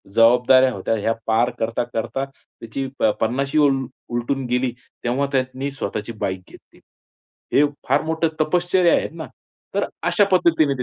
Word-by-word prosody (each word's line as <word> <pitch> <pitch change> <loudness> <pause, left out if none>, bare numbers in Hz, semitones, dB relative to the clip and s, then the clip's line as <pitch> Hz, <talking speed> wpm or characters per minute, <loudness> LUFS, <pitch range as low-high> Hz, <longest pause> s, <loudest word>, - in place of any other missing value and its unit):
जबाबदाऱ्या 125 +3 +5
होत्या, 100 +3 -1
ह्या 110 +2 0
पार 115 +2 +3
करता-करता 115 +2 -2
त्याची 135 -1 -8
प - - -2 0.2
पन्नाशी 135 +6 0
उल 135 -1 0 0.2
उलटून 120 +3 -2
गेली. 125 +1 0 0.3
तेव्हा 130 +4 0
त्यानी 130 +1 -1
स्वतःची 110 -4 -4
बाईक 95 -1 -3
घेतली. - - -18 0.7
हे 145 - +6 0.2
फार - - +3
मोठं 160 +1 0
तपश्चर्या 175 +2 +3
आहे - - -1
ना. 160 -1 -7 0.5
तर - - +1 0.2
अशा 205 - +3
पद्धतीने 165 -5 +3
130 Hz, 140 wpm, -21 LUFS, 115-140 Hz, 0.7 s, हे